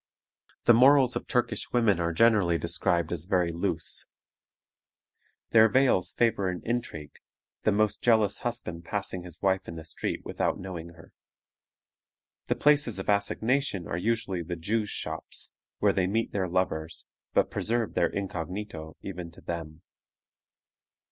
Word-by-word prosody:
The 120 - +7
morals 130 +1 +6
of - - -4
Turkish 125 -3 -1
women 115 -6 +3
are 85 0 0
generally 100 -3 +4
described 85 0 0
as 85 -2 -2
very 90 -2 +1
loose. 85 +1 -2 1.4
Their 110 -1 +7
veils 130 -6 +3
favor 110 -5 +2
an 90 -1 -5
intrigue, 115 -11 -4 0.5
the 110 - +5
most 105 0 +1
jealous 110 -4 +3
husband 115 -8 -4
passing 95 0 -3
his 90 0 -10
wife 95 -1 +1
in 85 - -6
the 80 -1 -8
street - - -4
without - - -1
knowing 85 -3 -7
her. 85 - -16 1.3
The - - +1
places 145 -7 +3
of 95 - -5
assignation 105 0 +1
are - - -3
usually 110 -1 -1
the 85 +1 -4
Jews' 105 +5 -1
shops, - - -5 0.3
where - - +3
they 90 -1 +1
meet 115 +4 0
their 95 -2 -1
lovers, 85 -3 -2 0.3
but - - +3
preserve 115 0 -1
their - - +2
incognito 90 -3 -5
even 90 -3 -6
to - - -15
them. 80 -2 -6
95 Hz, 140 wpm, -28 LUFS, 85-115 Hz, 1.4 s, The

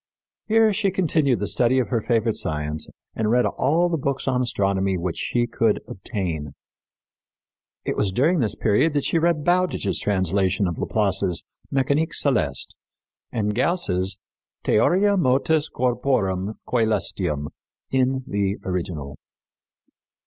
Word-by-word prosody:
Here 220 -1 +4
she 195 - +1
continued 155 - +1
the 105 - -1
study 120 +4 +2
of 130 - +1
her 115 -3 0
favorite 115 -1 +1
science, 75 0 -2 0.3
and 110 -1 0
read 125 +2 +3
all 160 +6 +2
the 165 -2 -1
books 135 0 -2
on 130 -1 +2
astronomy 95 -5 +1
which 85 -1 -3
she 120 -1 0
could 115 -2 +1
obtain. 90 - -4 1.3
It - - -1
was 100 - +1
during 155 - +2
this 115 -5 0
period 115 +9 +2
that 145 - +1
she 165 - +1
read 165 -2 +1
Bowditch's 175 - +1
translation 95 0 +1
of 85 - -4
Laplace's 95 -4 0 0.3
Mécanique 140 +4 +1
Céleste 90 - 0 0.6
and 105 -2 -1
Gauss's 100 - 0 0.5
Theoria 200 - +3
Motus 150 +1 +2
Corporum 110 -6 0
Cælestium 105 - 0 0.4
in 130 0 +1
the 100 -3 -1
original. 85 -6 -4
115 Hz, 125 wpm, -23 LUFS, 95-140 Hz, 1.3 s, Here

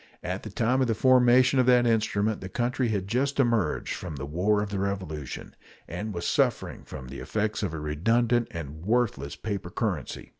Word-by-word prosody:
At 90 +3 -3
the 110 - -7
time 120 +6 +1
of 130 - +2
the 115 - +1
formation 130 +1 +5
of 125 - +3
that 125 -1 +5
instrument 110 -2 +1
the 95 - -6
country 120 +4 0
had 100 -4 -1
just 135 +6 0
emerged 115 - +1
from 85 -4 -6
the 70 0 -5
War 100 +8 +1
of 105 - -6
the 100 - -2
Revolution, 95 -8 -4 0.3
and 105 +6 -4
was 85 -3 -4
suffering - - 0
from 65 - -8
the 70 - -7
effects 110 0 -2
of - - -1
a 80 - -5
redundant 115 +11 +1
and 80 -1 -7
worthless 100 - 0
paper 100 -3 -4
currency. - - -3
105 Hz, 190 wpm, -27 LUFS, 90-120 Hz, 0.3 s, formation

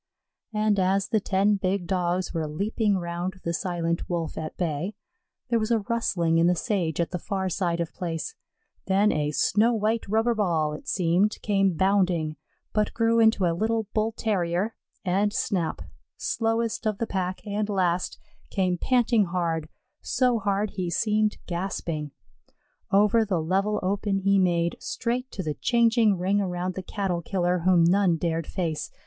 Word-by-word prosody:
And 210 -1 +2
as 195 +1 +1
the 220 - +2
ten 200 +1 +2
big 190 -1 -1
Dogs 180 0 -1
were 160 -2 -1
leaping 200 +5 0
round 175 +1 -4
the 170 - -1
silent 170 -2 -2
Wolf 170 -2 -2
at 155 -1 -6
bay, 170 +3 -2 0.5
there 235 -1 +2
was 215 0 -1
a 235 - +4
rustling 190 -7 0
in 170 - +4
the 180 - +3
sage 175 -5 -1
at 170 - 0
the 180 - -3
far 190 +1 -2
side 170 -2 -1
of 170 -1 -3
place; 170 - -4 0.5
then 200 +2 +3
a 150 -1 0
snow 215 - +2
white 220 +1 0
rubber 225 +3 +2
ball, 165 -8 0
it 150 - -9
seemed, 185 +4 +1
came 195 -4 +2
bounding, 180 -5 +2 0.4
but 210 -1 0
grew 230 0 +3
into 220 -4 +4
a 170 - +2
little 220 +5 0
Bull 220 +1 +1
terrier, 200 -2 -1 0.3
and 195 +3 +2
Snap, 180 -5 -1 0.3
slowest 225 0 -1
of 215 -2 0
the 230 - -1
pack, 185 -2 -3
and 210 0 -2
last, 180 -3 0 0.3
came 185 -3 0
panting 240 -4 +3
hard, 170 -3 -2 0.3
so 250 -2 +1
hard 200 0 0
he 185 -3 -3
seemed 215 +4 +1
gasping. 170 -4 -3 0.8
Over 210 +3 +4
the 195 -5 0
level 195 +6 0
open 200 +1 0
he 195 0 +3
made, 170 -2 +1
straight 250 +2 -2
to 190 - -4
the 155 -2 -2
changing 230 - +3
ring 195 +3 +1
around 180 -1 -2
the 190 - -5
Cattle 185 -2 -2
killer 180 0 0
whom 175 0 +4
none 180 0 +3
dared 165 -1 -1
face. 160 -5 -3
190 Hz, 165 wpm, -26 LUFS, 170-210 Hz, 0.8 s, a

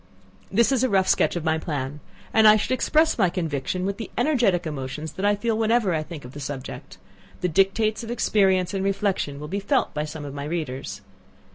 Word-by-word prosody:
This 235 +6 +3
is 260 -2 +2
a 260 - +2
rough 190 -2 +2
sketch - - +3
of 175 - -3
my 160 0 +1
plan; 145 -2 -4 0.3
and 220 -1 +6
should - - -3
I - - +4
express 310 +2 +2
my 190 -4 +4
conviction 170 0 -2
with 200 0 -2
the 225 - -6
energetic 240 - +2
emotions 150 +1 -5
that 190 - -4
I 205 - +3
feel 225 +2 -1
whenever 220 -3 +2
I 155 - 0
think 155 -3 -8
of 125 - -9
the 145 - -9
subject, 135 -1 -7 0.4
the 180 - +1
dictates 195 +5 +1
of 230 - -7
experience 195 -5 +2
and 195 -1 -1
reflection 195 -7 -1
will 150 - -6
be 195 +6 -2
felt 265 +7 0
by 150 0 -2
some 150 -1 -7
of 140 - -7
my 140 0 -5
readers. 135 - -4
185 Hz, 215 wpm, -24 LUFS, 150-215 Hz, 0.4 s, and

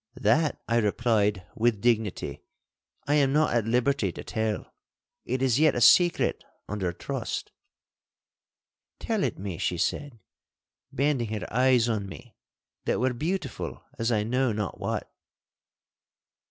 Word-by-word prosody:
'That,' 150 +4 +2
I 115 - +2
replied, 105 -3 +1
with 115 -2 +2
dignity, 110 -3 0 0.6
'I 145 - +1
am 140 -2 +3
not 155 0 +3
at 115 -2 +1
liberty 120 -3 +1
to - - -8
tell. 110 -2 -3 0.5
It 130 +2 -1
is 130 0 +3
yet 155 -1 +4
a - - 0
secret 175 +8 +4 0.2
under 95 -4 -2
trust.' 85 - -4 1.5
'Tell - - -1
it - - -1
me,' 95 -3 -5
she 90 - -1
said, 135 - -2 0.7
bending 135 -3 0
her - - -6
eyes 125 -1 +4
on 105 -4 -1
me, 120 +4 -12 0.5
that - - +1
were 130 +1 +1
beautiful 160 +1 -4 0.2
as 115 +1 +1
I 105 -2 +2
know 125 +3 +1
not 105 -2 -3
what. - - -3
120 Hz, 135 wpm, -27 LUFS, 105-135 Hz, 1.5 s, yet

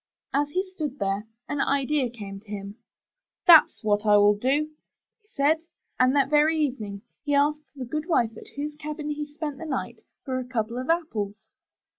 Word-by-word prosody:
*' - - -48
As 290 - -3
he 370 +5 0
stood 310 -8 -5
there, 200 0 -1 0.2
an 290 -1 -1
idea 280 -1 +1
came 200 -4 -8
to 215 - -26
him. 200 -1 -5 0.7
''That's 325 -7 +7
what 205 -1 +2
I 210 -1 +6
will 205 0 +6
do," 275 +8 0 0.5
he 420 - -36
said, 310 -2 +2 0.4
and 255 +2 +4
that 280 -2 +4
very 305 +2 +4
evening 220 -9 -2 0.2
he 290 -1 +1
asked 300 +1 +1
the 260 -2 -5
good 305 +6 -3
wife 235 -8 +2
at - - -13
whose 295 +1 -3
cabin 300 0 -4
he 295 0 -3
spent 295 -1 -5
the 330 - -6
night, 265 - -3 0.3
for 260 -2 -1
a - - -3
couple 240 -1 -2
of 255 - -5
apples. 230 -12 0
280 Hz, 190 wpm, -26 LUFS, 220-300 Hz, 0.7 s, That's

